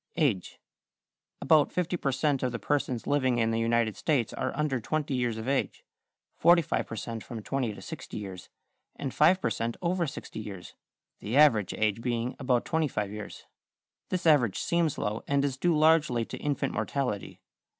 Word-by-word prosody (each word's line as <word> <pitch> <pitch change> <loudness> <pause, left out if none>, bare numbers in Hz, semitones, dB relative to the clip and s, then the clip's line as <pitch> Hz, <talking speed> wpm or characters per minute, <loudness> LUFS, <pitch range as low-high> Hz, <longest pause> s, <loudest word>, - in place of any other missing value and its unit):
=Age.= 115 - 0 0.8
About 150 +1 +4
50 180 0 -1
per 140 - -1
cent. 135 +1 +1
of 125 - 0
the 115 - -3
persons 130 -3 -1
living 130 -4 +2
in 115 -1 +2
the 115 - 0
United 115 -2 +1
States 130 -2 0
are - - -2
under 150 -4 0
20 150 +5 -2
years 120 -3 0
of 110 +2 -6
age, 135 0 -1 0.5
45 170 -1 +3
per - - -6
cent. 115 +1 -5
from 115 -4 -7
20 125 -5 -2
to - - -11
60 - - -7
years, 95 -4 -7 0.5
and 135 -3 -4
5 170 +5 +5
per 115 - -1
cent. 115 +2 -2
over 175 -1 0
60 140 -5 -7
years, 100 -4 -8 0.5
the 115 +6 -2
average 115 -10 +5
age 110 0 0
being 120 +1 -2
about 125 -3 +1
25 135 -11 -1
years. 105 0 -8 0.6
This 180 -1 -2
average 140 - +4
seems 170 -3 0
low, 105 +2 -2
and 140 0 +2
is 135 -2 -1
due 165 +4 +1
largely 155 -7 +3
to - - -7
infant 145 -2 -1
mortality. 125 -8 -2
130 Hz, 175 wpm, -28 LUFS, 115-150 Hz, 0.8 s, 5